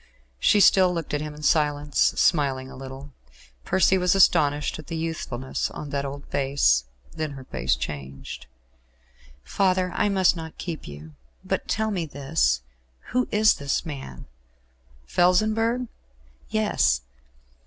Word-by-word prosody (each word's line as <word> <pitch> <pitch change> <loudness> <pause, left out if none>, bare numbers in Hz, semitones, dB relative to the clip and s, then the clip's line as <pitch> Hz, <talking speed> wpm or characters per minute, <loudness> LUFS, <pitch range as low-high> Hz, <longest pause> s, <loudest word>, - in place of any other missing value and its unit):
She 210 - +4
still 185 -1 +6
looked 165 -4 -4
at 145 - 0
him 150 -1 -6
in 150 - -11
silence, 145 -1 +1
smiling 135 -5 +2
a - - -10
little. 135 +1 -9 0.5
Percy 190 +1 +3
was 180 +1 +2
astonished 150 -6 +3
at 155 - -11
the 165 - -4
youthfulness 155 -6 -3
of 145 -2 -8
that 140 0 -2
old 140 +1 -7
face. 135 - +2 0.3
Then 155 -2 -4
her 135 -1 -9
face 65 - -1
changed. 65 -1 -7 1.0
"Father, 185 -2 +1
I 210 - +1
must 190 -2 +3
not 160 -1 -8
keep 170 -3 -6
you; 75 +2 -10 0.3
but - - -2
tell 220 0 0
me 175 -5 -2
this 140 - 0 0.5
Who 250 +1 +1
is 215 +1 +5
this 140 +4 -2
man?" 135 - -8 0.8
"Felsenburgh?" 215 - +2 0.6
"Yes." 205 - +2
150 Hz, 135 wpm, -25 LUFS, 135-185 Hz, 1.0 s, still